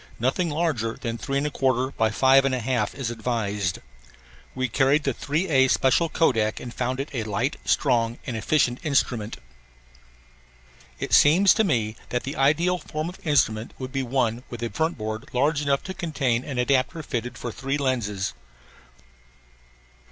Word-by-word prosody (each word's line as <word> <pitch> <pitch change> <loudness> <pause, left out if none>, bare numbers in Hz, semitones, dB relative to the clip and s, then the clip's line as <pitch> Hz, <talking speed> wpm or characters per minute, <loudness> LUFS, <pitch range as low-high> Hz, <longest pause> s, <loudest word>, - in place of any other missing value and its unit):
Nothing 135 +9 0
larger 145 -8 -1
than 115 -2 -4
3 140 0 -1
1/4 130 -3 0
x 110 -1 +1
5 135 +1 +6
1/2 125 -4 0
is 130 -4 -3
advised. 105 -6 -2 0.8
We 130 0 0
carried 135 +4 +2
the 135 - 0
3A 145 -3 +1
special 135 +7 +3
Kodak 115 -10 +1
and 120 -1 -8
found 130 +1 -2
it 140 - -3
a 120 - -1
light, 110 +7 -1
strong, 120 -4 +1
and 120 - -4
effective 120 +2 +1
instrument. 120 -7 0 1.6
It - - -4
seems 175 +7 +6
to 220 - +2
me 115 - 0
that 125 - -2
the 140 - -5
ideal 165 +6 +2
form 155 +1 -4
of 180 - -11
instrument 115 -6 +1
would 130 -1 -6
be 135 0 -1
one 120 -2 0
with 120 -1 -6
a 115 - -2
front 160 +1 -1
board 110 +5 -5
large 145 +4 +2
enough 140 -1 0
to 190 - -5
contain 140 -10 -1
an 135 -3 -6
adapter 130 +4 +1
fitted 125 -3 -4
for 120 - -5
three 135 +4 -2
lenses. 110 -8 -1
130 Hz, 155 wpm, -25 LUFS, 115-145 Hz, 1.6 s, 5